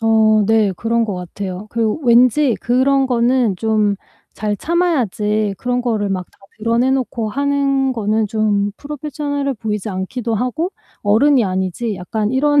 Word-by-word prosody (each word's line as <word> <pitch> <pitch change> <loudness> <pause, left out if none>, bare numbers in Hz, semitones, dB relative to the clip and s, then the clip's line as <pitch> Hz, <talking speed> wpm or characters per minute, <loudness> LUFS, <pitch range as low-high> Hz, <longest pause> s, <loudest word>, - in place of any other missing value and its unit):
어 220 -1 +4
네. 220 -3 +3
그런 230 +1 0
것 205 -4 -3
같아요. 185 +2 -6
그리고 230 +4 -1
왠지 245 +2 +4
그런 265 +3 +2
거는 240 -4 +2
좀 215 -2 +1 0.4
잘 210 -1 -1
참아야지 220 - 0
그런 245 0 -1
거를 220 -4 0
막 185 -1 -2
다 - - -29 0.2
드러내 230 +4 +1
놓고 245 -4 -1
하는 275 +1 +1
거는 220 -1 0
좀 205 -2 +1
프로페셔널해 285 -1 -3
보이지 210 -2 -3
않기도 210 +5 -3
하고 280 - -1 0.3
'어른이 235 +4 +4
아니지.' 190 +4 -2
약간 210 +4 -2
이런 290 +2 +3
230 Hz, 300 characters per minute, -18 LUFS, 210-265 Hz, 0.4 s, 어